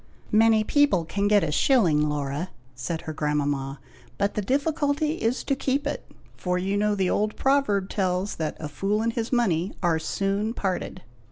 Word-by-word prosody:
"Many 220 0 +5
people 280 - +3
can 200 +4 -1
get 205 -2 +4
a 155 - -1
shilling, 155 - +3
Laura," 145 +4 -3 0.2
said 125 +7 -4
her 155 - -6
grandmama; 145 -2 -1 0.4
"but 200 0 0
the 210 - -1
difficulty 290 - 0
is 230 +3 0
to 275 - 0
keep 270 +2 -1
it; 290 - -4 0.3
for 180 -1 -1
you 190 +2 -1
know 210 0 +1
the 190 -2 +1
old 210 +1 0
proverb 265 -9 +2
tells 190 0 -1
that 155 -2 -3
'a 155 - -4
fool 200 +8 -1
and 230 0 0
his 230 -1 -3
money 195 -8 +1
are 165 -2 +2
soon 200 +6 -1
parted.'" 185 -1 -3
200 Hz, 175 wpm, -25 LUFS, 160-230 Hz, 0.4 s, Many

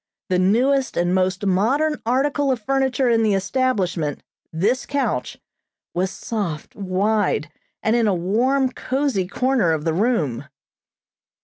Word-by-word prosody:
The 180 -1 +2
newest 255 +8 +2
and 175 +1 +1
most 185 +1 0
modern 265 +12 +1
article 275 +3 +1
of 255 - -1
furniture 265 +2 0
in 230 -1 +3
the 215 -3 +2
establishment, 195 - -1 0.3
this 210 +11 0
couch, 245 - -2 0.6
was 185 +2 0
soft, 185 -8 -5
wide, 195 -4 0 0.3
and 220 - +2
in 235 -2 +2
a 200 - +2
warm, 250 +9 +1
cozy 260 -8 -1
corner 250 -4 +1
of 155 0 -3
the 165 - +1
room. 160 - 0
215 Hz, 130 wpm, -22 LUFS, 185-260 Hz, 0.6 s, in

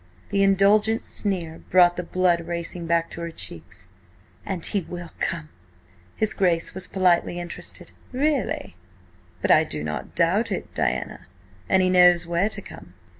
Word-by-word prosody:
The 200 - +1
indulgent 200 +3 +3
sneer 175 -6 -3
brought 175 -1 +5
the 180 - -2
blood 175 -1 +1
racing 170 0 -4
back 170 0 +1
to 170 - -7
her 170 - -3
cheeks. 95 - -10 0.6
"And 190 -5 -2
he 200 - +1
will 175 -1 -8
come!" 165 -2 -2 0.7
His 215 -1 +1
Grace 170 -3 +1
was 185 -1 -5
politely 180 -2 +2
interested. 175 0 -6 0.2
"Really? 275 - -1 0.7
But - - +3
I - - +6
do 75 -1 -5
not 75 -1 -5
doubt - - +2
it, - - -4
Diana, - - -2 0.4
an 190 - +4
he 185 - +3
knows 180 -1 +6
where 170 +4 +1
to - - -2
come." - - -12
175 Hz, 155 wpm, -24 LUFS, 170-195 Hz, 0.7 s, I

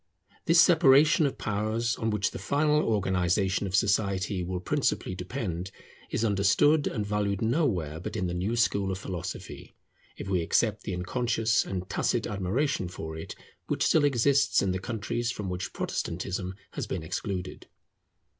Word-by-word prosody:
This 165 0 +5
separation 155 -3 +6
of 135 - -5
powers, 110 +3 -1
on 110 - -1
which 105 -2 0
the - - -7
final 150 +1 +2
organization 95 - +1
of 95 - -2
society 100 -1 +1
will 90 +1 -3
principally 90 - -1
depend, 90 -2 -4 0.4
is 115 - 0
understood 105 +9 +3
and 105 -4 -2
valued 100 -1 -1
nowhere 110 - 0
but 90 - -6
in 90 - -1
the 85 - -2
new 95 +6 -1
school 100 -4 +1
of 95 - -3
philosophy, 95 -3 -7 0.4
if - - -7
we 95 -3 +1
except 105 +5 +1
the 95 - -2
unconscious 115 +4 +1
and 95 -1 -5
tacit - - 0
admiration 100 +3 -1
for 80 -2 -7
it 80 - -7 0.3
which - - 0
still 155 - +4
exists 140 0 +3
in 95 - +1
the 95 - -2
countries 120 +3 -3
from 105 -6 -5
which 90 0 -4
Protestantism 90 +2 -3 0.2
has - - -4
been 90 -4 -4
excluded. 90 +2 -5
100 Hz, 155 wpm, -28 LUFS, 90-120 Hz, 0.4 s, separation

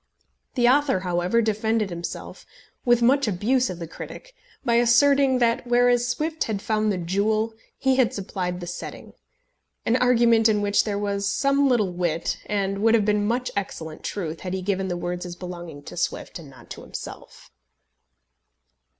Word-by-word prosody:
The 240 -2 +3
author, 265 -6 +3
however, 180 +5 +1
defended 220 -1 0
himself, 170 0 -6 0.4
with 240 -1 +4
much 275 +2 +4
abuse 240 +7 +1
of 180 - -5
the 170 - -5
critic, - - -10 0.3
by 235 - +2
asserting, 265 +3 +4
that 240 0 +1
whereas 245 0 +3
Swift 310 +5 -1
had 215 -3 -2
found 215 +1 0
the 195 - -1
jewel 210 +6 0 0.2
he 265 -1 +2
had 255 -4 +3
supplied 180 -2 -4
the - - -5
setting; 175 - -8 0.7
an 230 - +2
argument 235 -3 +4
in 210 -1 +2
which 205 0 +2
there 205 -2 -1
was 200 -1 -1
some 275 +2 +2
little 210 -7 +2
wit, 170 -2 -1
and 195 -1 -1
would 225 +2 +4
have 215 -3 +2
been 210 0 +1
much 245 +3 -1
excellent 160 -5 -5
truth, 165 -5 -4
had 185 0 -4
he 190 - -4
given 190 0 -1
the 175 -1 -2
words 175 0 -4
as 175 -1 -7
belonging 175 -5 -8
to - - -9
Swift - - -3
and - - -12
not - - -16
to - - -7
himself. - - -10
210 Hz, 170 wpm, -24 LUFS, 185-240 Hz, 0.7 s, with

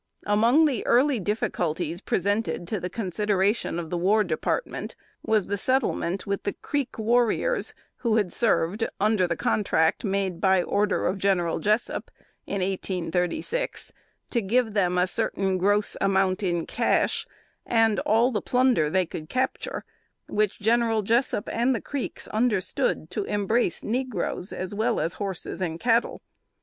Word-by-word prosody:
Among 230 +9 +4
the 270 -7 0
early 255 +1 +4
difficulties 175 -4 -2
presented 205 -2 -1
to 215 - -1
the 180 - -4
consideration 205 -1 0
of 165 -2 -5
the 175 - -1
War 210 +5 +3
Department, - - -3 0.3
was 215 -3 +1
the 200 0 -2
settlement 210 -7 0
with 200 0 -2
the 200 - -2
Creek 285 -4 -3
warriors 240 - +1 0.2
who 230 -3 0
had 205 -5 +1
served 215 -2 +1 0.2
under 205 -2 +2
the - - -1
contract 160 -6 +1
made 195 -4 -1
by 190 -2 +4
order 205 +3 0
of 190 +2 0
General 180 -4 +1
Jessup, 215 +3 0 0.4
in 200 - -2
1836, 185 - -2 0.4
to 235 - +1
give 225 +2 +1
them 180 -3 +1
a 180 - +4
certain 190 +1 0
gross 205 +2 +2
amount 190 0 +2
in 175 -4 -1
cash, - - 0 0.4
and 225 -3 +2
all 230 +4 +3
the 215 - -1
plunder 250 -11 +2
they 185 +3 +2
could 155 -1 -8
capture 260 +1 -2 0.4
which 210 -1 0
General 225 0 +2
Jessup 230 0 +1
and 245 +3 +2
the - - -1
Creeks 280 -3 -5
understood 205 -7 0
to 210 - -2
embrace 205 0 0
negroes, 225 -6 -2
as 185 +1 -5
well 225 +3 0
as 165 - -1
horses 190 -1 -4
and 165 -2 -2
cattle. 235 +2 +1
205 Hz, 145 wpm, -26 LUFS, 185-230 Hz, 0.4 s, Among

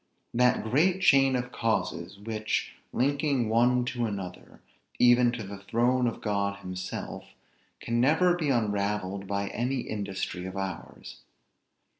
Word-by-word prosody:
That 125 +1 +3
great 165 +12 +2
chain 135 -5 +5
of 125 0 -2
causes, 100 -6 -2
which, 110 +1 -2 0.2
linking 140 -2 +1
one 120 +2 +3
to 120 -3 -1
another, 95 -4 -7 0.4
even 120 0 +5
to 120 -3 -4
the 100 0 -8
throne 120 +5 +1
of 115 - -4
God 100 -1 -1
himself, 90 0 -6 0.5
can 120 0 0
never 160 +7 +4
be 160 -4 -1
unravelled 105 -4 -1
by 100 0 -2
any 125 +3 -1
industry 95 -4 -4
of 95 +1 -7
ours. 95 -2 -6
115 Hz, 130 wpm, -28 LUFS, 100-125 Hz, 0.5 s, chain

